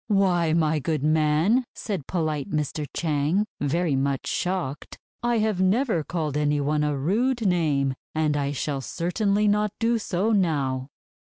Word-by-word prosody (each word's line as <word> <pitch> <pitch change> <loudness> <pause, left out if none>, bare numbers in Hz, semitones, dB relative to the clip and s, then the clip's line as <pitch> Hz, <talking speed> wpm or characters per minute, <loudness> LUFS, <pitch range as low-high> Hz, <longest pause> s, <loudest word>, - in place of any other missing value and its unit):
"Why, 185 -6 +2
my 160 -2 +2
good 150 0 -2
man," 155 - +3
said 190 - -4
polite 155 -5 -2
Mr. 150 0 -2
Chang, 160 +5 0
very 150 +1 0
much 135 0 -1
shocked, 175 -6 -3 0.2
'I 240 -1 +1
have 215 -4 +1
never 195 - +2
called 155 -3 -3
any 150 0 +1
one 150 +1 +1
a 150 -1 0
rude 225 - 0
name, 150 -7 +2 0.2
and 155 -1 +1
I 140 -1 0
shall 140 0 -2
certainly 200 - 0
not 210 +1 +2
do 230 0 +1
so 200 +1 0
now.' 140 -9 0
160 Hz, 150 wpm, -25 LUFS, 145-200 Hz, 0.2 s, man